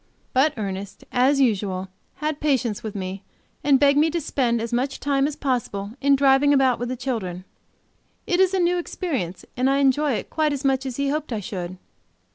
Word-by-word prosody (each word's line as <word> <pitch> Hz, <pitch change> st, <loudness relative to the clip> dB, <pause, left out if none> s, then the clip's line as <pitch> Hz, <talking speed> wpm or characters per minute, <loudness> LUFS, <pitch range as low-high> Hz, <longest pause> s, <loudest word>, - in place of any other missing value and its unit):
But 270 Hz, +4 st, +3 dB
Ernest, 200 Hz, -1 st, -5 dB
as 265 Hz, +3 st, +3 dB
usual, 195 Hz, -7 st, +1 dB, 0.3 s
had 305 Hz, +1 st, -3 dB
patience 260 Hz, -8 st, 0 dB
with 215 Hz, -2 st, -6 dB
me 190 Hz, 0 st, -5 dB, 0.4 s
and 275 Hz, -2 st, +4 dB
begged 285 Hz, 0 st, +5 dB
me 315 Hz, +2 st, +4 dB
to 340 Hz, +2 st, -1 dB
spend 250 Hz, -6 st, 0 dB
as 230 Hz, +1 st, -4 dB
much 260 Hz, +3 st, -1 dB
time 280 Hz, -1 st, +1 dB
as 295 Hz, -, -4 dB
possible 230 Hz, -8 st, -2 dB
in 280 Hz, 0 st, +5 dB
driving 275 Hz, +1 st, +4 dB
about 265 Hz, -2 st, +3 dB
with 245 Hz, 0 st, -3 dB
the 255 Hz, -, -2 dB
children. 195 Hz, -9 st, -4 dB, 0.8 s
It 355 Hz, -, +1 dB
is 380 Hz, 0 st, +4 dB
a -, -, +1 dB
new 350 Hz, 0 st, +2 dB
experience, 265 Hz, -, -4 dB
and 255 Hz, +1 st, +2 dB
I 275 Hz, -, +3 dB
enjoy 280 Hz, +1 st, +3 dB
it -, -, -4 dB
quite 310 Hz, -2 st, +1 dB
as 280 Hz, 0 st, -4 dB
much 270 Hz, 0 st, +1 dB
as 255 Hz, -, -5 dB
he 280 Hz, 0 st, 0 dB
hoped 305 Hz, -1 st, -2 dB
I 225 Hz, -, -1 dB
should. 185 Hz, -3 st, -5 dB
265 Hz, 200 wpm, -23 LUFS, 220-285 Hz, 0.8 s, begged